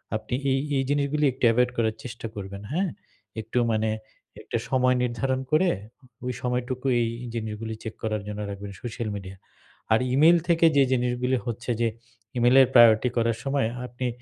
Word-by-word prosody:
আপনি 110 Hz, +2 st, -5 dB, 0.2 s
এই, 135 Hz, -, +2 dB, 0.2 s
এই 135 Hz, -, +1 dB
জিনিসগুলি 145 Hz, +1 st, +1 dB
একটু 130 Hz, -, -13 dB
অ্যাভয়েড 125 Hz, +2 st, +3 dB
করার 110 Hz, -1 st, +1 dB
চেষ্টা 115 Hz, -2 st, -6 dB
করবেন 100 Hz, 0 st, -7 dB
হ্যাঁ? 185 Hz, +4 st, 0 dB, 0.5 s
একটু 110 Hz, +3 st, -5 dB
মানে 110 Hz, 0 st, +1 dB, 0.5 s
একটা -, -, -3 dB
সময় 125 Hz, -1 st, +3 dB
নির্ধারণ 125 Hz, +2 st, -1 dB
করে, 175 Hz, +4 st, +4 dB, 0.6 s
ওই 125 Hz, -, -1 dB
সময়টুকু 125 Hz, +1 st, -2 dB, 0.2 s
এই 115 Hz, -, +1 dB, 0.2 s
জিনিসগুলি 110 Hz, 0 st, -4 dB
চেক 110 Hz, -, -5 dB
করার 110 Hz, -2 st, -1 dB
জন্য 105 Hz, 0 st, -5 dB
রাখবেন 100 Hz, 0 st, -7 dB
সোশ্যাল 115 Hz, -2 st, -4 dB
মিডিয়া। 95 Hz, -1 st, -8 dB, 0.6 s
আর 110 Hz, -, +5 dB
E-mail 160 Hz, +6 st, +6 dB
থেকে 170 Hz, -1 st, +4 dB
যে 140 Hz, -, +7 dB
জিনিসগুলি 125 Hz, 0 st, +1 dB
হচ্ছে 120 Hz, +1 st, -3 dB
যে 115 Hz, -, +3 dB, 0.5 s
E-mail 120 Hz, +2 st, +4 dB
এর 130 Hz, -, +5 dB
প্রায়োরিটি 120 Hz, 0 st, +7 dB
করার 115 Hz, -1 st, +1 dB
সময় 135 Hz, -3 st, +1 dB, 0.2 s
আপনি 125 Hz, +1 st, -4 dB
120 Hz, 165 wpm, -25 LUFS, 110-130 Hz, 0.6 s, যে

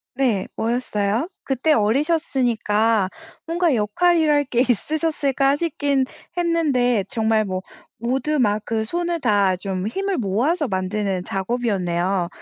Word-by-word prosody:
네. 235 Hz, -8 st, +1 dB
뭐였어요? 225 Hz, -, -1 dB
그때 270 Hz, +4 st, 0 dB
어리셨으니까 230 Hz, -, +1 dB, 0.4 s
뭔가 335 Hz, -2 st, +1 dB
역할이랄 295 Hz, +7 st, +2 dB
게 245 Hz, -1 st, +1 dB
있으셨을까 280 Hz, +1 st, +1 dB
싶긴 290 Hz, -4 st, 0 dB, 0.3 s
했는데 285 Hz, -, +1 dB
정말 220 Hz, 0 st, +1 dB
뭐 185 Hz, -1 st, -3 dB, 0.4 s
모두 265 Hz, +6 st, -1 dB
막 210 Hz, -4 st, +3 dB
그 225 Hz, -1 st, -1 dB
손을 345 Hz, +7 st, -2 dB
다 205 Hz, -6 st, +3 dB
좀 190 Hz, +1 st, -3 dB
힘을 390 Hz, -, -2 dB
모아서 250 Hz, -, 0 dB
만드는 190 Hz, -1 st, -2 dB
작업이었네요. 190 Hz, -4 st, -1 dB
240 Hz, 265 characters per minute, -22 LUFS, 205-300 Hz, 0.4 s, 막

